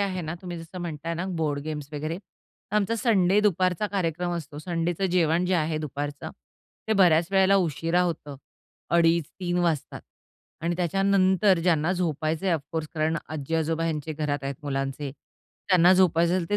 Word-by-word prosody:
आहे 190 -2 -1
ना, 155 +1 -4
तुम्ही 175 -2 -6
जसं 165 +3 -9
म्हणताय 165 -1 -4
ना 175 +3 -3
बोर्ड 145 -2 0
गेम्स 150 -2 -5
वगैरे. 155 +3 -3
तर 200 +1 -9
आमचा 210 +2 +1
संडे 205 -4 +3
दुपारचा 185 -1 +1
कार्यक्रम 180 -3 -2
असतो. 145 -3 -7
संडेचं 170 +2 -1
जेवण 170 -1 +2
जे 185 - +1
आहे 155 -1 0
दुपारचं, 145 -1 -5 0.6
ते - - +3
बऱ्याच 175 -5 +4
वेळेला 195 0 +4
उशिरा 165 -1 +1
होतं. 155 -5 -3 0.5
अडीच, 170 -1 +4 0.2
3:00 175 -1 -1
वाजतात 160 -5 -1 0.6
आणि 170 +1 0
त्याच्यानंतर 190 +1 +3
ज्यांना 165 -1 +2
झोपायचंय, 165 0 -1
ऑफकोर्स 155 0 -3
कारण 160 +1 0
आजी-आजोबा 160 +2 -1
ह्यांचे 155 -1 -2
घरात 150 -1 -2
आहेत, 135 0 -3
मुलांचे, 135 0 -3 0.6
त्यांना 180 -1 +6
झोपायचं 170 -2 +3
असेल 185 -2 0
तर - - +1
ते - - +4
165 Hz, 160 wpm, -26 LUFS, 155-185 Hz, 0.6 s, त्यांना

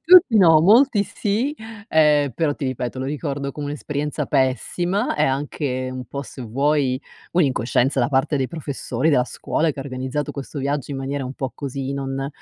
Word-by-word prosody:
Tutti 335 -9 +7
no, 165 -5 +7
molti 220 - +5
sì, 225 +9 -1 0.3
ehm, 150 -2 +4
però 145 +3 0
ti 145 - -5
ripeto, 130 0 -3
lo 130 - -3
ricordo 140 -1 -3
come 145 +1 -5
un'esperienza 150 0 -3
pessima 175 - 0
e - - +2
anche 135 -1 -2
un 130 0 -6
po' 140 - -5
se 130 - -9
vuoi 135 +2 +1 0.3
un'incoscienza 135 -4 +2
da 120 - +2
parte 140 +1 +1
dei 130 -2 -1
professori 145 -3 -2
della 125 -4 +3
scuola, 160 +5 -1
che 145 - -9
ha - - -2
organizzato 130 +2 -3
questo 140 +1 -6
viaggio 140 0 -2
in 140 - -3
maniera 135 +1 -3
un 130 +2 -6
po' 135 -1 -4
così, 135 -1 -4
non 135 0 -3
140 Hz, 180 wpm, -22 LUFS, 130-155 Hz, 0.3 s, Tutti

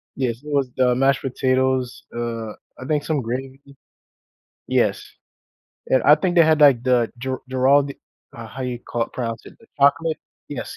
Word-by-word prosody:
Yes, 125 -4 -2
it 150 - -9
was 140 -3 +1
the 125 -1 +3
mashed 135 +1 +2
potatoes, 130 -1 0
uh, 115 -2 -4 0.3
I 130 - -8
think 150 -1 0
some 150 -3 -1
gravy 130 +3 -5 1.1
Yes. - - +1 0.9
And 130 - +3
I 150 - +7
think 175 +3 -1
they 170 - +7
had, 155 -1 +3
like, 135 -5 +6
the 125 -3 +1
Gir 130 +1 -3
Giraldi 135 +2 +2 0.4
uh, 115 -1 -8
how 130 +4 -7
you 125 -1 -3
call 120 -1 -3
pronounce 115 -3 -5
it? - - -14
The 230 - -20
chocolate 145 +3 +2 0.3
Yes, - - -6
130 Hz, 165 wpm, -21 LUFS, 125-140 Hz, 1.1 s, I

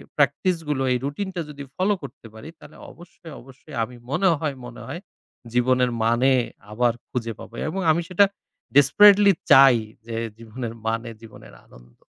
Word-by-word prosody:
প্র্যাকটিসগুলো, 165 -7 0
এই - - +1
রুটিনটা 180 +5 -4
যদি 145 -1 -9
ফলো 195 +3 +1
করতে 120 -2 -11
পারি, 110 +8 -11
তাহলে - - -15
অবশ্যই, 170 -1 -15
অবশ্যই, 135 +3 -14
আমি 125 +2 -8 0.2
মনে 180 +6 +2
হয় 145 -3 -3
মনে 120 -1 -10
হয় 175 - -7 0.5
জীবনের 125 0 +2
মানে 120 +4 +3 0.4
আবার 120 +2 +1 0.2
খুঁজে 115 -2 -4
পাবো। - - -12 0.2
এবং 190 - -4
আমি 165 +2 +1
সেটা 185 +2 +5 0.5
ডেসপারেটলি 200 +8 +7 0.2
চাই, 135 -3 +8 0.3
যে 115 -1 -6 0.2
জীবনের 115 +1 -7
মানে 115 +1 -2
জীবনের 115 -2 -14
আনন্দ। - - -20
135 Hz, 150 wpm, -23 LUFS, 120-165 Hz, 0.5 s, চাই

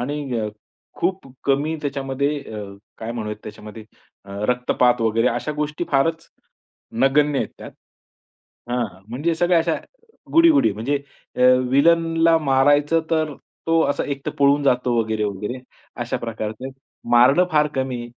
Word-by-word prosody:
आणि 140 -1 -3
अ, 105 - -2 0.5
खूप 185 -2 -2 0.2
कमी 145 +3 +1
त्याच्यामध्ये 140 +1 -2 0.2
अ, 105 -1 -5 0.3
काय 115 +1 -5
म्हणूयात 105 -3 -5
त्याच्यामध्ये 105 +1 -10 0.4
अ, 100 - -14 0.2
रक्तपात 125 0 +2
वगैरे 115 +1 +2
अशा 120 +6 -2
गोष्टी 150 +2 -3
फारच 165 +4 +1 0.7
नगण्य 145 +1 +3
आहेत - - -1
त्यात. - - -9 1.0
हां, 120 0 0
हां. 95 -1 -16
म्हणजे 145 +8 -1
सगळ्या 175 +1 +3
अशा 165 0 0 0.6
गुडी-गुडी. 325 - +5
म्हणजे 115 +8 -1 0.4
अ, - - -4 0.3
विलनला 165 +3 +4
मारायचं 145 +2 +3
तर 155 -2 0 0.3
तो 165 0 +3
असा - - -1
एक 140 0 -7
तर - - 0
पळून 140 +1 +4
जातो 125 -2 +2
वगैरे-वगैरे, 105 +1 -2 0.4
अशा - - -3
प्रकारचं. 110 +2 -5 0.4
मारणं 130 +9 +6
फार 150 0 +4
कमी 130 -2 -3
135 Hz, 135 wpm, -21 LUFS, 120-150 Hz, 1.0 s, मारणं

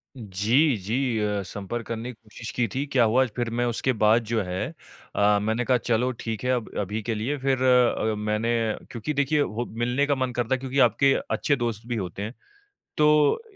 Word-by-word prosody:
जी, 115 +6 +2
जी 115 +4 -1
अ, 105 -1 0
संपर्क 105 +5 -5
करने 115 +2 -4
की - - -12
कोशिश 110 +1 -9
की 120 -1 +1
थी 135 +2 0
क्या 130 -3 +4
हुआ 120 +4 +4
फ़िर 120 -1 -1
मैं 120 - +2
उसके 120 +2 0
बाद 110 +1 +3
जो 115 0 0
है 90 0 -3 0.5
अ, 105 0 +4
मैंने 110 +4 -1
कहा 125 0 +3
चलो 120 +2 0
ठीक 115 0 -4
है 125 - +1
अब 125 -3 -1
अभी 105 +2 -2
के 115 +1 -2
लिए 120 +8 -2
फ़िर 130 -1 0
अ, 125 -3 +3
मैंने 105 +2 -1 0.4
क्योंकि 120 +5 -3
देखिए 145 +1 +2
हो 120 -2 -2 0.2
मिलने 125 +4 +1
का 145 - +2
मन 130 -1 -1
करता 120 +2 0
है - - -6
क्योंकि 135 +1 -2
आपके 135 0 +4 0.2
अच्छे 145 - +1
दोस्त 115 -3 -3
भी 120 - -2
होते 95 -3 -4
हैं। 110 +3 -4 0.6
तो 150 - +4
120 Hz, 205 wpm, -25 LUFS, 110-130 Hz, 0.6 s, क्या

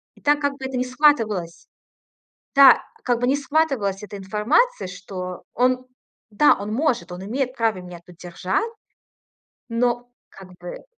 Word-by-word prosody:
И - - -21
так, 290 0 +3
как 285 -1 0
бы, 265 - -5
это 265 -1 -3
не 250 - 0
схватывалась 230 - +2 1.0
Да, 275 -3 +8 0.2
как 245 -2 +1
бы 245 - 0
не 270 - +3
схватывалась 270 -10 0
эта 205 -1 -8
информация, 215 - +1
что 180 0 -7
он, 255 +1 +1 0.4
да, 230 +8 +5
он 205 +1 -4
может, 235 - 0
он 180 +1 -7
имеет 255 +4 -2
право 225 -4 +1
меня 180 -1 -10
тут 180 -2 -16
держать, 180 - -2 1.0
но 240 +1 0 0.2
как 190 -1 -14
бы 175 - -9
235 Hz, 155 wpm, -22 LUFS, 190-270 Hz, 1.0 s, Да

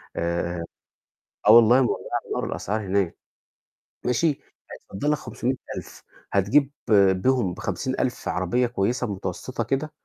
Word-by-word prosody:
آآ 85 0 -2 0.9
آه - - +10
والله 120 +3 +7
مولعة 120 - -1 0.3
نار - - -1
الأسعار 110 +3 -2
هناك. 95 -3 0 0.9
ماشي، 125 +7 +2 0.4
هيتفضَّل 145 +10 -3
لك 150 - +1
500000، 125 0 -5 0.3
هتجيب 130 +9 +3 0.4
بيهم 100 -1 +1
ب50000 - - -2
عربية 95 +8 +1
كويسة 120 +3 -1
متوسطة 95 +5 -4
كده، 145 +3 -2
115 Hz, 105 wpm, -24 LUFS, 95-130 Hz, 0.9 s, آه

